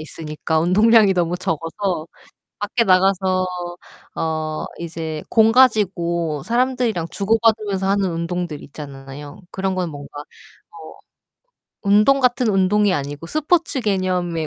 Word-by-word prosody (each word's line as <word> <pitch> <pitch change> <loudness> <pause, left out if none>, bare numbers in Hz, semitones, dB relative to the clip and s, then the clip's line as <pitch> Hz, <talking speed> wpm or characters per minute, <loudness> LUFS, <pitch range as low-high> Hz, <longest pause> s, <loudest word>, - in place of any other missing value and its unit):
있으니까 155 0 -3
운동량이 210 +4 +5
너무 175 0 0
적어서 165 0 -3 0.5
밖에 210 +3 0
나가서 185 -1 +2 0.7
어 155 -1 -2
이제 160 -2 -5
공 220 -1 +4
가지고 175 - +2
사람들이랑 240 -7 0
주고받으면서 215 -2 +1
하는 195 -2 +1
운동들 170 -2 -4
있잖아요. 140 +1 -10
그런 190 0 -2
거는 180 -2 -2
뭔가 145 -1 -9
어 - - -11 1.6
운동 210 +7 +4
같은 250 -2 +2
운동이 200 0 +2
아니고 145 +2 -5
스포츠 310 - 0
개념의 180 -6 -1
185 Hz, 280 characters per minute, -20 LUFS, 160-210 Hz, 1.6 s, 운동량이